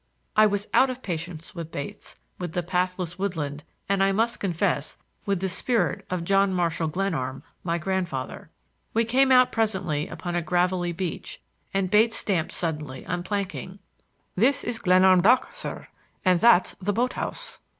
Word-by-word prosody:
I 215 0 +7
was 205 0 -1
out 265 - +5
of 255 0 -6
patience 170 +1 -5
with 165 -3 -7
Bates, 140 -1 -7 0.2
with 175 -3 -4
the 175 - -1
pathless 180 0 -2
woodland, 150 -7 -3 0.2
and, 200 0 +1
I 195 0 +4
must 225 +4 0
confess, 175 -5 -1 0.3
with 195 -3 0
the 190 - 0
spirit 185 - 0
of 180 -2 -2
John 195 +2 +3
Marshall 170 -2 0
Glenarm, 155 -7 -2 0.2
my 170 -1 0
grandfather. 175 -7 -3 0.5
We 230 0 +3
came 265 +4 +3
out 255 -1 +6
presently 190 -9 0
upon 175 -3 -5
a 175 - +1
gravelly 175 +1 +1
beach, 175 0 -5 0.3
and 195 -1 0
Bates 225 +2 +4
stamped 175 -5 -1
suddenly 150 -6 -3
on 180 0 -2
planking. 190 0 -4 0.6
"This 250 +8 +3
is 240 - -2
the - - -13
Glenarm 185 0 +6
dock, 250 - +4
sir; - - -6 0.4
and 180 -2 +4
that's 230 -4 +5
the 205 +2 0
boat 245 +4 0
house." - - -5
185 Hz, 165 wpm, -25 LUFS, 170-205 Hz, 0.6 s, I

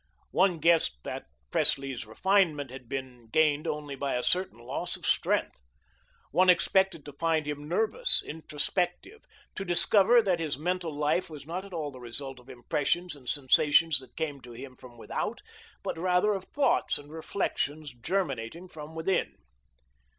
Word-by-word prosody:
One 185 -2 +3
guessed 165 - +3
that - - -6 0.2
Presley's 135 -5 +1
refinement 160 - +2
had 130 -2 -10
been 130 -3 -6
gained 150 +4 +2
only 150 -1 -3
by 140 0 -2
a 125 - -1
certain 180 -9 +1
loss 130 +9 -3
of - - -9
strength. - - +1 0.7
One 185 0 +4
expected 180 -1 +3
to 145 - -9
find 160 +1 0
him 145 0 -5
nervous, 225 - +3
introspective, 175 - -3 0.3
to 190 - -4
discover 200 +5 +5
that 185 -4 +1
his 155 -5 -2
mental 175 +1 -2
life 150 +4 0
was 150 -3 -9
not 180 +5 -4
at 200 - -12
all 155 -4 -3
the 130 - -11
result 130 +2 -6
of 125 +1 -18
impressions 150 +7 -1
and 130 -4 -8
sensations 145 +3 +4
that 130 -2 -16
came 145 -4 -3
to 120 -1 -11
him 130 +2 -9
from 120 -1 -14
without, - - -4 0.4
but - - -3
rather 180 +4 +3
of 195 -2 -4
thoughts 285 - +1
and 145 +1 -12
reflections 155 -3 -3
germinating 150 +1 -3
from 155 -2 -10
within. 170 +4 0
155 Hz, 160 wpm, -29 LUFS, 135-180 Hz, 0.7 s, discover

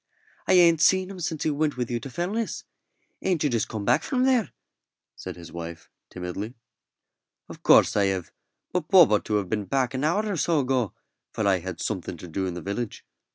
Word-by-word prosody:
"I - - +4
ain't 170 -3 +6
seen 185 +2 +4
him 190 - -9
since 160 -3 -3
he 155 - +1
went 150 -1 -1
with 125 -1 -2
you 120 - -1
to 135 - -8
Fellness. 195 - -3 0.6
Ain't 180 -5 0
you 145 - +1
just 115 -3 0
come 110 -3 -4
from 255 -2 -1
there?" 255 -5 +3 0.7
said - - -7
his 85 -2 -11
wife, 85 -1 -8 0.2
timidly. 95 +6 -6 0.9
"Of - - -11
course - - +5
I 100 -1 +3
have, 95 -3 -2 0.4
but 175 -4 -1
Bob 180 - +7
ought 105 - +2
to 105 - -1
have 100 -3 0
been 105 +2 -2
back 130 +1 0
an 130 +1 -2
hour 175 +8 +1
or 205 -4 -2
so 160 0 +2
ago, 125 -5 0 0.4
for 110 - -1
I 95 -2 +3
had 90 -1 -6
something 90 -4 -3
to 90 - -10
do 95 +3 -2
in 90 - -4
the 90 - -5
village. 105 +4 -4
125 Hz, 205 wpm, -26 LUFS, -, 0.9 s, Bob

